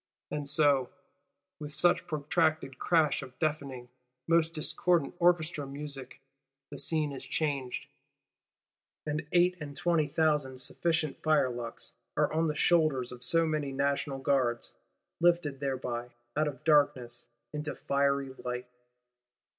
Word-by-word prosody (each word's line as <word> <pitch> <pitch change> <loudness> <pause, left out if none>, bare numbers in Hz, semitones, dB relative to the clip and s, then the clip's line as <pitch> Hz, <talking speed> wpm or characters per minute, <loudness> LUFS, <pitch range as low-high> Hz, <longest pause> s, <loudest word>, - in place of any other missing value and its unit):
And 145 -1 -3
so, 145 -4 +4 0.7
with 150 -1 -6
such 175 +2 +2
protracted 155 -3 0
crash 160 -4 +3
of 125 -1 -11
deafening, 140 -5 -2 0.4
most 165 -1 +3
discordant 160 0 +1
Orchestra 170 -4 +2
music, 140 -2 -7 0.5
the 145 - -7
Scene 155 -3 0
is 135 - -6
changed: 140 -5 -2 1.2
and 150 0 -3
eight 180 +1 +4
and 145 -1 -6
twenty 170 -3 +2
thousand 145 -4 +1
sufficient 160 +2 -1
firelocks 125 -6 0 0.3
are - - +2
on 160 +1 +2
the 150 - -1
shoulders 155 -7 +3
of 125 0 -8
so 165 +5 +3
many 155 -3 -1
National 140 0 0
Guards, 130 -3 0 0.5
lifted 170 -5 +2
thereby 125 -3 -3 0.3
out 155 +1 +2
of 135 -4 -6
darkness 125 -6 +2 0.3
into 150 0 -3
fiery 140 -1 0
light. 125 0 -3
145 Hz, 125 wpm, -30 LUFS, 135-160 Hz, 1.2 s, so